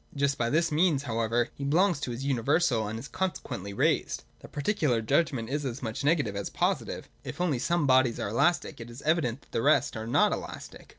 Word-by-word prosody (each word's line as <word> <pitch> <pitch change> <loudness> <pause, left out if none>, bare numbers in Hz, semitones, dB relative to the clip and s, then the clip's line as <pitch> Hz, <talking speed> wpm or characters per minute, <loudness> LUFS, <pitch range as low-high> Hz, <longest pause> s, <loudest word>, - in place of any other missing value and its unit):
Just 140 0 +1
by 120 -3 0
this 165 +4 +2
means 155 -3 +2
however 115 -1 0
he 140 - -8
belongs 170 +3 +2
to 140 - -4
his 120 +3 -4
universal, 135 -2 +1
and 110 +2 -4
is 120 +4 -7
consequently 120 - -4
raised. 100 - 0
— - - -36
The - - -12
particular 145 - 0
judgment 130 0 +1
is 145 +1 -1
as 130 -1 -4
much 110 +3 -4
negative 145 -9 +1
as 100 - -3
positive. - - -1 0.2
If - - -7
only 165 -8 +1
some 170 +4 +1
bodies 130 -3 +3
are - - -2
elastic, 145 +3 +1
it 115 - -8
is 120 +3 -10
evident 150 -6 +1
that - - -26
the - - -1
rest 145 0 +3
are 110 0 -5
not 115 - +3
elastic. - - -8
135 Hz, 215 wpm, -28 LUFS, 115-155 Hz, 0.2 s, bodies